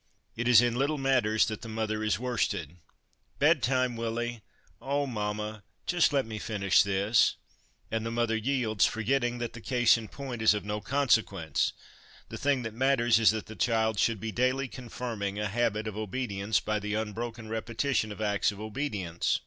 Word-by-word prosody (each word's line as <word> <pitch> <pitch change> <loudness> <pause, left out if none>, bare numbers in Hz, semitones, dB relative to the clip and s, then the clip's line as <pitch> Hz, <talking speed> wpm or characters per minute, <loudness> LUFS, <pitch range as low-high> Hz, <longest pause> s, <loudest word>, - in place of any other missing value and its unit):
It 120 +1 -2
is 120 -1 +7
in 120 -1 +1
little 145 +3 +1
matters 130 -6 +2
that 110 -2 -5
the 115 - -8
mother 110 -1 -2
is 110 - +1
worsted. 110 - -1
1 85 - -21 0.6
Bedtime, 130 0 +2
Willie! 115 0 -3
' - - -36
' - - -35
Oh, 140 +1 0
mamma, 105 -3 -3 0.2
just 175 -3 +3
let 140 -2 +1
me 110 -1 -6
finish 100 -3 +2
this 100 +3 +3 0.3
'; - - -38
and 110 0 -1
the 115 - -2
mother 115 -1 0
yields, 110 -2 0
forgetting 120 +2 0
that 120 -1 -4
the 115 - -9
case 120 -1 +3
in 110 - -8
point 130 -3 -6
is 110 -1 +5
of 105 - -4
no 105 +1 -3
consequence; 105 - +1 0.6
the - - -6
thing 140 -3 +1
that 110 -2 -5
matters 120 -2 +3
is 110 - +6
that 110 -1 -1
the 110 - -10
child 110 +3 +1
should 115 -3 +2
be 110 +2 -4
daily 130 +3 +1
confirming 115 -5 -5
a 105 0 -1
habit 110 0 0
of 105 - -5
obedience 105 -1 -1
by 105 0 -1
the 105 +1 -3
unbroken 110 +1 -4
repetition 115 +1 -1
of 105 - -8
acts 105 -1 +1
of 100 - -11
obedience. 105 - -2
110 Hz, 190 wpm, -29 LUFS, 105-120 Hz, 0.6 s, is